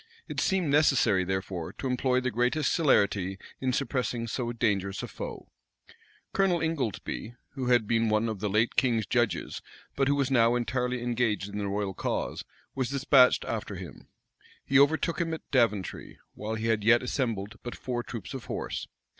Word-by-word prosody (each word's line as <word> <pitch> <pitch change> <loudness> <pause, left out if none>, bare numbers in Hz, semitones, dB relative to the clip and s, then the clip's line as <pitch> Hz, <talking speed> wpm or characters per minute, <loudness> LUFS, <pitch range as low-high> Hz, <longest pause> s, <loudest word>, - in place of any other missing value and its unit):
It - - -4
seemed 185 -6 +1
necessary, 135 -10 +4
therefore, 95 -2 -3
to - - -8
employ 125 0 +1
the 125 0 -1
greatest 125 +7 +1
celerity 100 - +2 0.2
in 130 -1 0
suppressing 125 -3 -1
so 120 +1 -2
dangerous 100 -5 -1
a - - -4
foe: - - -8 0.8
Colonel 190 -3 +2
Ingoldsby, 130 - -3 0.2
who 130 -3 -4
had 120 -3 +4
been 115 +1 +2
one 110 +1 +2
of 110 -3 -3
the 105 +1 -1
late 110 +4 +1
king's 115 -5 +2
judges, 120 +2 0 0.3
but 135 -1 +2
who 140 - +3
was 140 -1 0
now 120 -2 +4
entirely 125 0 -1
engaged 120 -5 0
in 105 +1 -5
the 100 - -2
royal 100 -1 -2
cause, - - -3 0.3
was 130 -3 -1
despatched 135 -2 +4
after 105 -3 -4
him. 90 -7 -10 0.6
He 135 0 +4
overtook 160 +4 +3
him 165 -1 -1
at - - -14
Daventry, 115 -8 0 0.2
while 110 +1 -4
he 110 0 -3
had 110 -2 +1
yet 120 +3 +5
assembled 115 -5 -2
but 120 - -6
four 125 -2 -3
troops 115 -6 -7
of 130 -3 -6
horse. - - -4
120 Hz, 170 wpm, -28 LUFS, 105-130 Hz, 0.8 s, yet